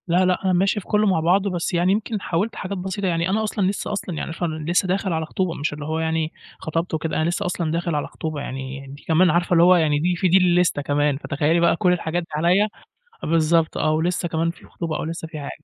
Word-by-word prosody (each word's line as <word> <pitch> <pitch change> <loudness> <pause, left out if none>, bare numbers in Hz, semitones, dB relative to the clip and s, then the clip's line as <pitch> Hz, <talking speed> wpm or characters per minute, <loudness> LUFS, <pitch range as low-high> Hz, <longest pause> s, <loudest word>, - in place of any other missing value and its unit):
لأ، 180 +2 +3
لأ، 180 +1 +1
أنا 185 - +3
ماشي 195 +4 +2
في 195 - -13
كلّه 210 0 +2
مع 190 -4 +2
بعضه، 190 +5 +2
بس 175 -1 -2
يعني 175 +2 +2
يمكن 210 0 -1
حاولت 195 +7 -1
حاجات 195 +1 -4
بسيطة، 190 +2 -3
يعني 170 0 0
أنا 215 +3 +1
أصلًا 210 -3 0
لسّه 200 +2 -2
أصلًا 190 -4 -4
يعني 160 - -4
ف 165 - -6
لسّه 165 +3 0
داخل 190 0 0
على 160 0 -1
خطوبة 185 +3 -1
ومش 150 -1 -3
اللي 145 0 -6
هو 160 +1 -2
يعني، 160 0 -1 0.3
خطبت 165 +2 -3
وكده. 160 0 -2
أنا 160 - +1
لسّه 175 - -2
أصلًا 170 -3 -1
داخل 170 -1 -1
على 145 - -1
خطوبة 155 -2 -5
يعني، 135 0 -6
دي 140 +2 -11
كمان 175 +3 +4
عارفة 175 +2 +1
اللي 170 -1 +6
هو 180 +1 +7
يعني 155 -4 +2
دي 175 +3 +1
في 185 - +1
دي 180 +2 +5
اللستة 180 -4 +3
كمان، 145 0 +1
فتخيّلي 150 +3 0
بقى 170 0 +4
كل 180 0 +2
الحاجات 175 0 -2
دي 165 - -16
عليّا، 180 +7 +3 0.6
بالضبط 165 0 +2
آه، 155 - +1
ولسّه 175 +3 0
كمان 165 0 0
في 170 - -13
خطوبة 165 -2 -4
أو - - -3
لسّه 165 0 -5
في 155 - -7
حاجة 145 - -6
170 Hz, 250 wpm, -22 LUFS, 160-185 Hz, 0.6 s, هو